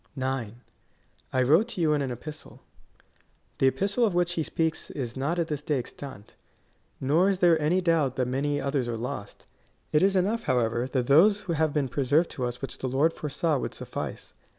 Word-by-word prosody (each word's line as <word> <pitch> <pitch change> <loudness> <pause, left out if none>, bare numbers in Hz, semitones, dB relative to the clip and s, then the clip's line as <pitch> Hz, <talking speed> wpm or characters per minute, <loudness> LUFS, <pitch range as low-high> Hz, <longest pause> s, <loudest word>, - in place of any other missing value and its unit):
9. 130 -4 -3 0.7
I 130 -1 +2
wrote 160 - +4
to 235 - -6
you 155 -2 +3
in 145 - +1
an 135 - -2
epistle. 150 +6 -9 1.0
The 135 - +4
epistle 200 - +1
of 205 -6 +2
which 175 0 +2
he 170 - -1
speaks 160 +1 -2
is 120 -4 -5
not 140 +6 -1
at 170 -2 0
this 150 -2 -3
day 150 -1 0
extant. 130 -3 -8 0.6
Nor 160 +8 +3
is 195 - +1
there 170 -3 +4
any 170 +5 +2
doubt 160 -7 +2
that 125 -2 0
many 145 +3 0
others 140 -3 -1
are 115 -1 -2
lost. 110 -3 -6 0.5
It 150 - +3
is 195 +1 +3
enough, 210 +5 +1
however, 120 -1 +1
that 130 -2 -1
those 190 - +5
have 160 -3 0
been 145 -2 0
preserved 145 +6 +1
to 125 - -3
us 120 +2 -5
which 135 - -6
the 130 - -2
Lord 145 +6 +2
foresaw 150 0 -1
would - - -4
suffice. - - -6
145 Hz, 195 wpm, -27 LUFS, 130-170 Hz, 1.0 s, those